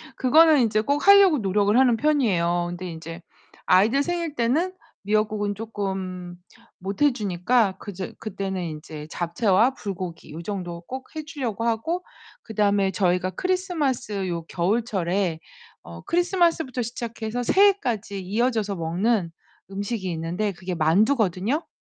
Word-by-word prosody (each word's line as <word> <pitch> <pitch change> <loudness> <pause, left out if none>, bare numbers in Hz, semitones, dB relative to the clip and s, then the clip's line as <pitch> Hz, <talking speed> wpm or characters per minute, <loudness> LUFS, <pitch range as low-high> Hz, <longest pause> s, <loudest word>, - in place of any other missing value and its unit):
그거는 310 +3 +5
인제 215 -2 +2
꼭 285 - -1
하려고 395 -5 +8
노력을 205 +2 +2
하는 255 -2 +5
편이에요. 180 - +1
근데 175 +1 -6
인제 165 +1 -8 0.5
아이들 215 +9 +4
생일 340 -2 -3
때는 295 +10 +1 0.3
미역국은 210 0 0
쪼끔 190 -4 -5 0.4
못해 205 +9 +1
주니까 200 0 +1
그저 190 -2 -6
그때는 195 -4 -4
이제 150 0 -9
잡채와 195 +7 +2
불고기 185 -7 -6
요 160 +3 -7
정도 175 -4 -5
꼭 260 - -9
해 310 - -4
주려고 250 -8 -4
하고 235 +11 -1 0.4
그다음에 205 -3 +1
저희가 180 -1 +1
크리스마스 290 - -1
요 170 -2 -3
겨울철에 190 -3 0 0.4
어 - - -10
크리스마스부터 340 -7 +1
시작해서 235 0 -4
새해까지 245 - +2
이어져서 215 +1 0
먹는 175 +2 0 0.4
음식이 200 -1 -3
있는데 175 +6 -2
그게 180 0 -6
만두거든요. 205 - +2
210 Hz, 315 characters per minute, -24 LUFS, 185-255 Hz, 0.5 s, 하려고